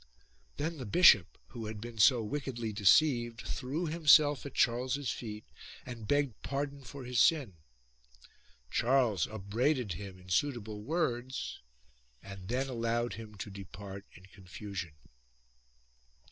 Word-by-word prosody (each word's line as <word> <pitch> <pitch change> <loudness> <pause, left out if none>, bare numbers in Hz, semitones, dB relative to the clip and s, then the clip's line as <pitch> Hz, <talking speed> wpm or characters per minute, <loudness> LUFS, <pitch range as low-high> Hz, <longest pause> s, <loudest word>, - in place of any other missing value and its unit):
Then 155 +2 -3
the 125 - -6
bishop, 105 - +6
who 115 -3 -7
had 110 -1 -6
been 115 0 -8
so 115 +2 +6
wickedly 120 -3 -4
deceived, 120 +3 +3
threw 140 +7 -3
himself 150 -3 +5
at 135 - -11
Charles's 130 +3 +1
feet 105 -2 -7 0.4
and 115 -4 -8
begged 145 -4 0
pardon 140 0 -3
for 135 +2 -9
his 125 -1 -1
sin. 145 - +3 1.2
Charles 120 -7 +2
upbraided 110 - -1
him 95 +2 -8
in 90 0 -15
suitable 110 -1 -1
words 130 -2 -2 0.6
and 95 -1 -9
then 130 +4 -1
allowed 120 -1 -1
him 110 -1 -9
to 100 +1 -7
depart 100 +1 -9
in 90 - -15
confusion. 95 -2 -8
120 Hz, 125 wpm, -32 LUFS, 105-135 Hz, 1.2 s, bishop